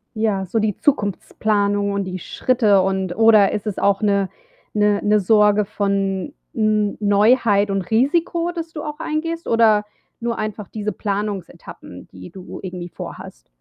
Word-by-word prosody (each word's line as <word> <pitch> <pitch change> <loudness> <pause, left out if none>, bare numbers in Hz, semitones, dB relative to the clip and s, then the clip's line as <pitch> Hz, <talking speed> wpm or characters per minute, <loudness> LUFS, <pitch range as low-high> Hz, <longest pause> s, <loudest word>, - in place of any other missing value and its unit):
Ja, 215 -3 0
so 225 +5 -1
die 215 -2 0
Zukunftsplanung 205 -4 0
und 200 0 -1
die 185 -1 -5
Schritte 215 0 +2
und 190 -1 -1
oder 220 -2 +5
ist 210 0 -3
es 210 -3 -3
auch 200 0 +2
'ne 200 -2 +1 0.4
'ne 210 -1 +2
'ne 210 0 +2
Sorge 210 +1 +4
von 200 +2 -2 0.2
N 215 -2 +1
Neuheit 205 0 +3
und 195 0 0
Risiko, 335 +8 +1
das 330 -1 -6
du 300 - -6
auch 300 0 -6
eingehst 330 +1 -3
oder 220 -2 +3 0.3
nur 235 0 -2
einfach 215 -2 -4
diese 210 +1 -4
Planungsetappen, 200 - -6
die 90 -1 -11
du 185 -2 -10
irgendwie 180 -2 -6
vorhast? - - -10
210 Hz, 150 wpm, -20 LUFS, 195-225 Hz, 0.4 s, oder